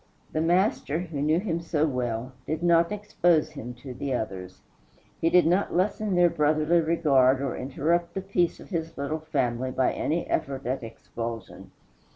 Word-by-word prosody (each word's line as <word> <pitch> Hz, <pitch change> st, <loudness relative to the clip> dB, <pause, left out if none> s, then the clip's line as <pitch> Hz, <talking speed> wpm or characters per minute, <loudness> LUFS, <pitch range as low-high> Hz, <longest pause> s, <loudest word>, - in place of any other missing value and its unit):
The 155 Hz, -, 0 dB
Master, 175 Hz, -2 st, +1 dB
who 165 Hz, -5 st, -4 dB
knew 155 Hz, +3 st, +3 dB
him 170 Hz, -4 st, -2 dB
so 160 Hz, -2 st, 0 dB
well, 125 Hz, -3 st, -2 dB, 0.2 s
did 155 Hz, +3 st, -2 dB
not 170 Hz, 0 st, +4 dB
expose 175 Hz, -6 st, +1 dB
him 125 Hz, -5 st, -7 dB
to 130 Hz, -3 st, -6 dB
the 135 Hz, +1 st, -2 dB
others. 95 Hz, -5 st, -5 dB, 0.6 s
He 165 Hz, -, +2 dB
did 180 Hz, +1 st, +5 dB
not 180 Hz, +5 st, +1 dB
lessen 200 Hz, +2 st, 0 dB
their 175 Hz, 0 st, +6 dB
brotherly 155 Hz, +1 st, +2 dB
regard 140 Hz, -6 st, +3 dB
or 135 Hz, -2 st, -2 dB
interrupt 165 Hz, +6 st, -1 dB
the 195 Hz, -, -1 dB
peace 180 Hz, -3 st, 0 dB
of -, -, -13 dB
his 165 Hz, -4 st, -4 dB
little 140 Hz, +3 st, -2 dB
family 130 Hz, -5 st, -1 dB
by 130 Hz, 0 st, +1 dB
any 165 Hz, +3 st, -1 dB
effort 135 Hz, 0 st, -2 dB
at 130 Hz, +2 st, -1 dB
expulsion. 115 Hz, 0 st, -7 dB
155 Hz, 170 wpm, -26 LUFS, 130-170 Hz, 0.6 s, their